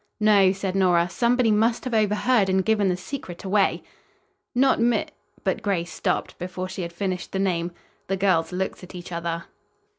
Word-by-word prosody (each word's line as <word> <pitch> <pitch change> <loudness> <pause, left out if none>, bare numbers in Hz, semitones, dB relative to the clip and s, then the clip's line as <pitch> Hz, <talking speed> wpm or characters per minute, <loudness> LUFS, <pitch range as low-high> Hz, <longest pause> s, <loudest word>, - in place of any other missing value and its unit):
"No," 205 -3 +5
said 195 -1 -3
Nora. 175 -3 +3
"Somebody 235 +5 +2
must 225 +2 +2
have 255 - -4
overheard 215 0 +2
and 190 0 +2
given 210 -3 +2
the 180 - 0
secret 180 -3 -7
away." 195 0 +1 0.7
"Not 265 0 +4
Mi 235 +1 +2 0.2
" - - -32
but - - 0
Grace 180 -5 -1
stopped - - -2
before 185 +1 -4
she 190 0 -6
had 170 -1 -4
finished 185 0 -4
the - - -1
name. 175 -3 0 0.4
The 195 - -1
girls 180 -4 +2
looked 190 +1 -3
at 180 - -11
each 175 0 -8
other. 170 0 -3
190 Hz, 180 wpm, -24 LUFS, 180-215 Hz, 0.7 s, No